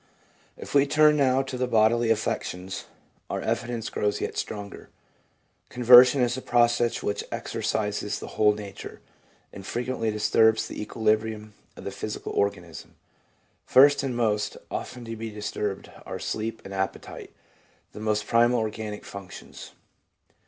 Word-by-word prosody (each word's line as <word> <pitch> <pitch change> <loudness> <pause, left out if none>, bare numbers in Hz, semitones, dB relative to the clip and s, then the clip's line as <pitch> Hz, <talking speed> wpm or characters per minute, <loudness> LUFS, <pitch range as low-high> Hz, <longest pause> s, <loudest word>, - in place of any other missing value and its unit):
If - - -9
we 140 0 +4
turn 150 +1 +5
now 135 -2 +3
to 130 -2 -6
the 125 - 0
bodily 115 0 +3
affections, 95 -4 -2 0.4
our - - -2
evidence 120 -2 -3
grows 105 0 -1
yet - - -4
stronger. 100 -1 -6 0.8
Conversion 125 +2 +7
is 120 -1 +1
a 130 - -5
process 120 -1 +2
which 100 - -2
exercises 105 -1 -2
the - - -8
whole 105 -1 +3
nature, 100 -2 -9 0.5
and 95 - -9
frequently 120 +1 -2
disturbs 110 +1 +3
the - - -7
equilibrium 110 0 -1 0.2
of - - -10
the - - -4
physical - - -5
organism. 90 -5 -3 0.7
First 140 +2 +6
and 130 -3 -3
most 105 -3 0
often 120 -1 -5
to 115 0 -6
be 115 0 -6
disturbed 105 -1 -4
are - - -6
sleep 110 +1 -4
and 100 - -8
appetite, 95 0 -4 0.6
the - - -10
most 105 -1 -1
primal 120 +2 +3
organic 110 -1 -4
functions. 100 -2 -10
110 Hz, 140 wpm, -26 LUFS, 105-120 Hz, 0.8 s, Conversion